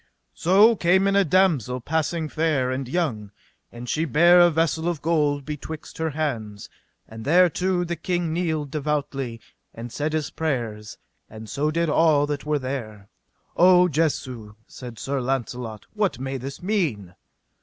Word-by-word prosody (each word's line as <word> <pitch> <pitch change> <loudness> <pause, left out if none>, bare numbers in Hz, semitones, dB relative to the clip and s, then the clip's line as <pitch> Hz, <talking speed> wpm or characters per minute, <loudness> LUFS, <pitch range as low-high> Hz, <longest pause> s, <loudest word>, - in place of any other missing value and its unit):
So 205 +7 +5
came 190 +1 +3
in 195 - +1
a 200 - +5
damosel 155 - +2
passing 160 +3 -1
fair 150 -5 0
and 130 0 -3
young, 125 - -2 0.4
and 120 +1 -9
she 155 +6 0
bare 170 +4 +5
a 175 0 +7
vessel 165 0 0
of 175 -3 -1
gold 150 -3 0
betwixt 150 +1 -7
her 160 0 0
hands; 120 -10 -4 0.4
and 110 0 -10
thereto 180 +3 +3
the 170 0 -3
king 175 0 -2
kneeled 160 -5 -2
devoutly, 140 -5 -3 0.4
and 115 +1 -8
said 150 +4 -2
his 155 -2 -2
prayers, 115 -9 -3 0.3
and 110 0 -10
so 145 +7 -1
did 170 +2 0
all 150 -2 +3
that 145 0 -4
were 150 0 +1
there. 115 -7 -6 0.5
O 180 0 +6
Jesu, 130 -9 -2
said 120 -3 -10
Sir 135 +2 -3
Launcelot, 120 -4 -4
what 210 -3 0
may 135 +1 -4
this 135 +5 -8
mean? 150 - -1
150 Hz, 155 wpm, -24 LUFS, 125-170 Hz, 0.5 s, a